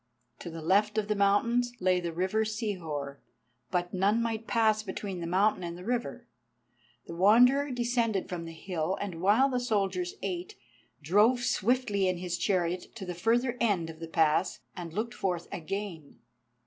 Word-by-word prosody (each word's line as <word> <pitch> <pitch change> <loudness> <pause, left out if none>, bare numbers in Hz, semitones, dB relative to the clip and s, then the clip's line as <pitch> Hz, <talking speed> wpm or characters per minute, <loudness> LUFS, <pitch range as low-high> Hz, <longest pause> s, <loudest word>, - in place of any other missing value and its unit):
To - - -7
the 165 -1 -7
left 210 +5 +2
of 210 -1 0
the 210 - +2
mountains 235 +5 +2
lay 185 0 +2
the 170 -1 -3
river 185 +6 0
Sihor, 175 - -4 0.5
but 175 0 -1
none 200 +4 +2
might 230 -1 -2
pass 220 -2 +3
between 195 -2 -5
the 170 - -4
mountain 190 +2 +2
and 170 0 -5
the 180 - -10
river. 240 +2 -3 0.8
The - - -8
Wanderer 250 +10 +5
descended 235 -5 0
from 170 -2 -5
the 165 - -7
hill, 170 +1 -3
and 185 -5 -5
while 210 +8 +5
the 255 -2 -1
soldiers 195 -7 -1
ate, 180 -2 -4 0.5
drove 210 - +4
swiftly 210 -4 +1
in 185 -1 0
his 175 0 -3
chariot 180 -1 -1
to 205 -5 -6
the 180 - -4
further 235 +7 +1
end 185 -8 +1
of 160 - -15
the 165 - -6
pass 160 +2 +1
and 170 -2 -6
looked 225 +7 -3
forth 180 -6 -2
again. 180 -3 -5
195 Hz, 170 wpm, -29 LUFS, 175-225 Hz, 0.8 s, Wanderer